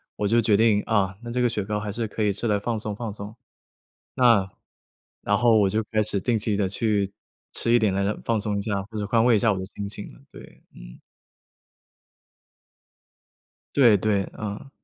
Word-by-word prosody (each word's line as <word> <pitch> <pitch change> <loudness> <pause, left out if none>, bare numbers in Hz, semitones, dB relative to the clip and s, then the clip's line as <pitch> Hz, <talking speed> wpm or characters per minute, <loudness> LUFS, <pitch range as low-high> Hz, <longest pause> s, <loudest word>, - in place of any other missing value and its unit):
我 105 - -1
就 115 +3 +3
决 105 -2 +3
定， 110 -2 +3
啊， 100 -3 +1
那 120 0 -7
这 125 - -2
个 125 - +3
雪 110 -3 -2
糕 105 +1 -3
还 105 0 -4
是 115 +2 -3
可 110 +1 -3
以 105 -1 +1
吃 110 +4 -3
来 105 -2 +2
放 115 +2 -2
松 105 -1 -4
放 110 -1 -5
松。 105 +1 -9 0.8
那 115 -7 +4 0.7
然 100 0 +1
后 115 +1 +4
我 100 -2 +3
就 110 +3 -1
开 110 -1 +2
始 105 -1 +2
定 115 0 0
期 105 0 0
地 100 -1 0
去 100 -1 0 0.4
吃 115 - +1
一 - - +7
点 105 -4 +1
来 100 +2 0
放 115 -2 0
松 105 -1 -2
一 - - -1
下， 100 -2 -2
或 110 +2 -10
者 105 - -2
宽 115 +2 +2
慰 120 -2 +5
一 - - +3
下 110 +1 +3
我 95 - -2
的 95 - -5
心 100 - -4
情， 105 0 -7 0.2
对。 - - -15
嗯。 - - -13 2.8
对 120 -7 +6
对， 100 -1 0
嗯。 105 +4 -6
105 Hz, 220 characters per minute, -24 LUFS, 100-115 Hz, 2.8 s, 一